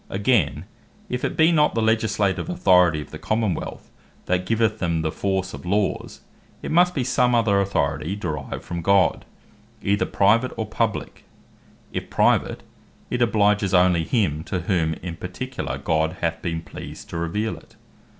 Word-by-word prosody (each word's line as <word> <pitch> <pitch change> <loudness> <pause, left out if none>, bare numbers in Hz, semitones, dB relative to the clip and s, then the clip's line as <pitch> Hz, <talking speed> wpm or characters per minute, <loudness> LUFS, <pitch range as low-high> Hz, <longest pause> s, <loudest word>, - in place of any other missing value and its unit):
Again, 100 - +1 0.4
if 125 0 -3
it - - -2
be 160 +1 +5
not 150 -2 +3
the 115 - +1
Legislative 110 - +1
Authority 90 - +4
of - - -11
the - - -8
Common 110 -3 0
wealth, - - -7 0.3
that 90 0 0
giveth 110 -1 +1
them 85 -3 0
the 80 - -1
force 95 0 -2
of - - -8
Laws, 100 +2 -1 0.4
it - - -4
must 180 +2 +4
bee 135 - 0
some 125 -1 +2
other 105 -4 +3
Authority 85 -1 -1
derived 75 -9 -5
from 85 -1 -5
God, 95 0 +3 0.6
either 100 +2 +1
private, 115 +6 +2
or 110 - -2
publique: 110 0 -3 0.7
if - - -4
private, - - +2 0.5
it 125 - -1
obliges 105 -4 +2
onely 90 -2 +4
him, 80 - 0
to 90 -1 -2
whom 80 -3 0
in 85 -2 -5
particular 65 - -5
God 80 +3 0
hath 80 -1 -1
been 80 -2 -3
pleased - - -9
to - - -4
reveale 105 +7 -2
it. - - -18
100 Hz, 160 wpm, -23 LUFS, 85-110 Hz, 0.7 s, be